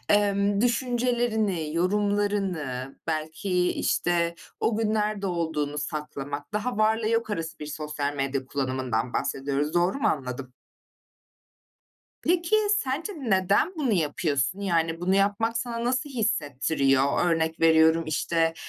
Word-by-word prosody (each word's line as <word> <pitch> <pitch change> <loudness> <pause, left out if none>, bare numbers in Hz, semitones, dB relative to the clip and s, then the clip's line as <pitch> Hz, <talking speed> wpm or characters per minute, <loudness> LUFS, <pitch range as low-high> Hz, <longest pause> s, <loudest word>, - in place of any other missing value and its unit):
ımm, 200 0 +2
düşüncelerini, 235 - 0
yorumlarını, 185 -8 0
belki, 165 +4 0
işte, 170 -1 0 0.2
o 220 -1 +1
gün 220 -1 +1
nerede 210 -2 0
olduğunu 160 -4 -2
saklamak, 145 0 -5
daha 215 +2 -2
varla 220 0 +2
yok 230 -1 0
arası 165 -4 -3
sosyal 150 -1 -3
medya 135 -1 -2
kullanımından 130 -3 -2
bahsediyoruz. 140 +3 -1
Doğru 175 +6 +2
mu - - +2
anladım? 130 -2 -3 1.7
Peki 345 +4 +2 0.2
sence 305 +6 -2
neden 200 - +2
bunu 270 -7 0
yapıyorsun? 155 0 0
Yani 165 -3 0
bunu 185 +2 +1
yapmak 205 +4 +1
sana 235 -1 -3
nasıl 255 +4 0
hissettiriyor? 145 - +1
Örnek 160 -1 0
veriyorum, 160 0 +5
işte, 165 +1 +1
175 Hz, 110 wpm, -26 LUFS, 150-215 Hz, 1.7 s, veriyorum